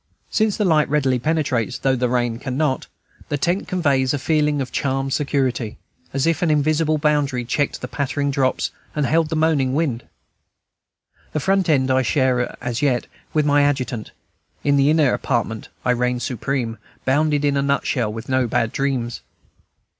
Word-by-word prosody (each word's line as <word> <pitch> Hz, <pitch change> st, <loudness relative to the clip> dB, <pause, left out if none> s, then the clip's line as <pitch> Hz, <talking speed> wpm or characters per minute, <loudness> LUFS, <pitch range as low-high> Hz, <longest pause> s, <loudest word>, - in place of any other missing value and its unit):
Since 215 Hz, -2 st, +1 dB
the 210 Hz, -, +1 dB
light 155 Hz, -4 st, +3 dB
readily 135 Hz, -4 st, +2 dB
penetrates, 140 Hz, -4 st, 0 dB
though 135 Hz, -1 st, +1 dB
the 125 Hz, -1 st, 0 dB
rain 120 Hz, -2 st, 0 dB
cannot, 135 Hz, +1 st, -1 dB, 0.4 s
the 145 Hz, -, 0 dB
tent 175 Hz, +7 st, 0 dB
conveys 140 Hz, -7 st, +1 dB
a -, -, -1 dB
feeling 150 Hz, +1 st, +1 dB
of 130 Hz, -2 st, -3 dB
charmed 135 Hz, 0 st, -1 dB
security, 130 Hz, -6 st, -1 dB, 0.3 s
as 135 Hz, 0 st, 0 dB
if 165 Hz, -2 st, +1 dB
an 175 Hz, -, +2 dB
invisible 155 Hz, +1 st, +2 dB
boundary 145 Hz, -4 st, +1 dB
checked 145 Hz, +4 st, -1 dB
the 125 Hz, -, -4 dB
pattering 140 Hz, +1 st, -1 dB
drops 135 Hz, -1 st, 0 dB, 0.2 s
and 150 Hz, -2 st, +1 dB
held 160 Hz, +1 st, +2 dB
the 160 Hz, -, -2 dB
moaning 150 Hz, -5 st, +2 dB
wind. 140 Hz, -7 st, 0 dB, 1.3 s
The 155 Hz, -, 0 dB
front 190 Hz, +4 st, +1 dB
tent 135 Hz, -4 st, +3 dB
I 130 Hz, 0 st, +3 dB
share, 130 Hz, -2 st, +1 dB
as 125 Hz, 0 st, -2 dB
yet, 130 Hz, -4 st, +1 dB, 0.3 s
with 150 Hz, -1 st, +1 dB
my 145 Hz, 0 st, +4 dB
adjutant; 130 Hz, -6 st, -1 dB, 0.5 s
in 145 Hz, 0 st, +3 dB
the 140 Hz, +1 st, +4 dB
inner 155 Hz, -4 st, +4 dB
apartment 115 Hz, -4 st, -2 dB, 0.2 s
I 125 Hz, -, +3 dB
reign 125 Hz, 0 st, 0 dB
supreme, 125 Hz, -2 st, -2 dB, 0.3 s
bounded 145 Hz, +2 st, +2 dB
in 140 Hz, -1 st, +2 dB
a 140 Hz, -, +2 dB
nutshell, 140 Hz, -5 st, 0 dB
with 110 Hz, +1 st, -7 dB
no 130 Hz, -1 st, +1 dB
bad 115 Hz, -1 st, 0 dB
dreams. 130 Hz, -4 st, -2 dB
140 Hz, 170 wpm, -21 LUFS, 125-150 Hz, 1.3 s, my